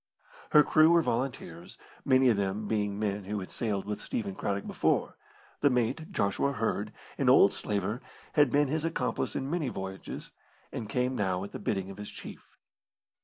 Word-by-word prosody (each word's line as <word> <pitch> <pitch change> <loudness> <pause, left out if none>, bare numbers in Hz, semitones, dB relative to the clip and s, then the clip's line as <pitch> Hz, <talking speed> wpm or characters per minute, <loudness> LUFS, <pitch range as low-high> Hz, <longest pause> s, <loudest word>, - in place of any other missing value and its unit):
Her 150 - +7
crew 155 +1 +5
were 170 -1 +5
volunteers, 115 - -3 0.3
many 130 -1 +5
of 115 - +4
them 100 +2 -1
being 105 -2 0
men 105 -2 -2
who 105 +1 -2
had 95 - -7
sailed 105 -4 -2
with 105 0 -4
Stephen 100 -4 -3
Craddock 100 +1 -2
before - - 0 0.4
the 145 - +4
mate, 130 - 0
Joshua 140 - +1
Hird, 110 -3 -1 0.3
an - - +3
old - - +7
slaver, 105 +3 -2 0.3
had 145 -3 +5
been 145 +3 +3
his 155 +3 -1
accomplice 165 -6 -1
in 135 - -2
many 155 -3 -1
voyages, 95 -3 -6 0.4
and 110 - -5
came 125 +1 0
now 95 -4 0
at 100 - -7
the - - -6
bidding 100 -2 -2
of 95 - -11
his 105 0 -7
chief. - - -11
110 Hz, 175 wpm, -30 LUFS, 100-135 Hz, 0.4 s, Her